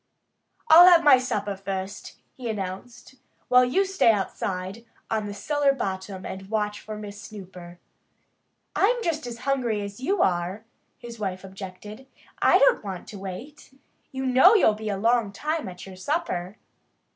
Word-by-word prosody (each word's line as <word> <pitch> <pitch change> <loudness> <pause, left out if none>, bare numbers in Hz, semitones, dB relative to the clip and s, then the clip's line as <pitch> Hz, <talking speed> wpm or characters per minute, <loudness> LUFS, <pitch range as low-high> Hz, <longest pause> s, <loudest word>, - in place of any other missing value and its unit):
"I'll 345 -1 +9
have 345 -2 +7
my 285 -4 +7
supper 210 -5 -2
first," 195 +1 -6 0.2
he 245 -3 -6
announced, 215 +5 -6 0.3
"while 250 0 +6
you 255 +11 +2
stay 380 -11 +3
outside 195 0 -3 0.3
on 215 -2 -1
the 205 - -5
cellar 285 +6 +1
bottom 190 -5 -5
and 190 0 -7
watch 210 -1 -2
for 215 0 -7
Miss 205 -1 -9
Snooper." 185 -5 -11 1.0
"I'm 470 +4 +2
just 315 - -2
as 235 -1 -6
hungry 250 -6 0
as 200 +1 -7
you 385 +10 +1
are," 180 +4 -1 0.3
his 235 -2 -10
wife 190 -2 -4
objected. 195 +5 -10 0.3
"I - - +6
don't - - +4
want 190 -3 -7
to 205 - -9
wait. 240 +9 -9 0.3
You 265 0 -4
know 265 - +6
you'll 290 - +5
be 215 0 -5
a 200 - -2
long 230 0 +2
time 300 +3 -3
at 180 -1 -10
your 190 -1 -11
supper." 205 - -3
215 Hz, 155 wpm, -25 LUFS, 195-265 Hz, 1.0 s, I'll